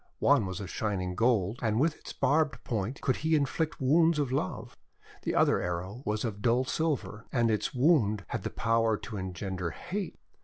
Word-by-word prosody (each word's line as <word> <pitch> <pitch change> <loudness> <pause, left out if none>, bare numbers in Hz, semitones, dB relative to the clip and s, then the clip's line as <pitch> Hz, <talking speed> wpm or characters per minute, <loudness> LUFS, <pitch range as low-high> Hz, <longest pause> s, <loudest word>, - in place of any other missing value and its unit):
One 100 - +3
was 95 -1 -5
of 95 -2 -6
shining 95 -4 -2
gold, 110 0 +1
and 110 -1 +1
with 155 +3 0
ks - - -7
barbed 155 0 +1
point 115 +2 -3
could 130 - +1
he 160 +1 +1
inflict 155 +2 0
wounds 160 +5 +4
of 140 -4 0
love. 130 -8 -3 0.5
The - - -2
other - - +4
arrow 90 +6 -4
was 105 +2 0
of 105 -3 -4
dull 120 +3 +3
silver, 140 -7 -2
and 120 -3 +2
its 105 +4 -1
wound 125 - +3
had - - -3
the - - -3
power 115 -1 +1
to 110 0 -7
engender 95 -1 -4
hate. 185 - -5
115 Hz, 185 wpm, -30 LUFS, 100-140 Hz, 0.5 s, wounds